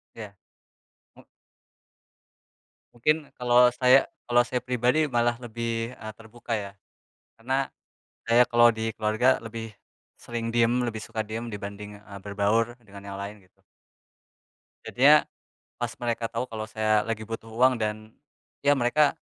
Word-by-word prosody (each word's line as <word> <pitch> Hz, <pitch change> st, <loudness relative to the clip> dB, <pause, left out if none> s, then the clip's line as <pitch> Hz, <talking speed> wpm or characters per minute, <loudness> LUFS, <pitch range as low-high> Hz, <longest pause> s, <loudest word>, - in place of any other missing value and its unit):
Ya, 105 Hz, -3 st, -9 dB, 0.8 s
mmm. -, -, -17 dB, 1.7 s
Mungkin, 150 Hz, +5 st, 0 dB
kalau 125 Hz, 0 st, +5 dB
saya 130 Hz, +4 st, +4 dB, 0.2 s
kalau 120 Hz, 0 st, +4 dB
saya 125 Hz, +1 st, -2 dB
pribadi 125 Hz, +5 st, +1 dB
malah 120 Hz, -3 st, +1 dB
lebih 115 Hz, 0 st, -4 dB
eee, 110 Hz, 0 st, -8 dB
terbuka 115 Hz, +1 st, -9 dB
ya, 100 Hz, -1 st, -7 dB, 0.6 s
karena 130 Hz, +3 st, -1 dB, 0.6 s
saya 115 Hz, +1 st, +5 dB
kalau 120 Hz, -1 st, +6 dB
di 110 Hz, 0 st, -2 dB
keluarga 110 Hz, +4 st, +2 dB
lebih 115 Hz, 0 st, -6 dB, 0.5 s
sering 115 Hz, -1 st, -5 dB
diem, 120 Hz, +1 st, +3 dB
lebih 110 Hz, -2 st, -3 dB
suka 110 Hz, 0 st, -4 dB
diem 110 Hz, +2 st, -5 dB
dibanding 105 Hz, 0 st, -8 dB
eee, 100 Hz, -1 st, -11 dB
berbaur 105 Hz, +4 st, +1 dB
dengan 100 Hz, -2 st, -13 dB
yang -, -, -6 dB
lain, 100 Hz, +1 st, -7 dB
gitu. 90 Hz, -, -34 dB, 1.3 s
Jadinya 140 Hz, +5 st, +6 dB, 0.6 s
pas 120 Hz, -1 st, -3 dB
mereka 120 Hz, -1 st, -2 dB
tahu 115 Hz, +2 st, -3 dB
kalau 110 Hz, -2 st, -5 dB
saya 110 Hz, -1 st, +1 dB
lagi 110 Hz, -1 st, -4 dB
butuh 115 Hz, 0 st, -7 dB
uang 125 Hz, +3 st, +4 dB
dan 110 Hz, -1 st, -4 dB, 0.5 s
iya 145 Hz, -, +5 dB
mereka 140 Hz, +5 st, +3 dB
115 Hz, 135 wpm, -26 LUFS, 110-120 Hz, 1.7 s, kalau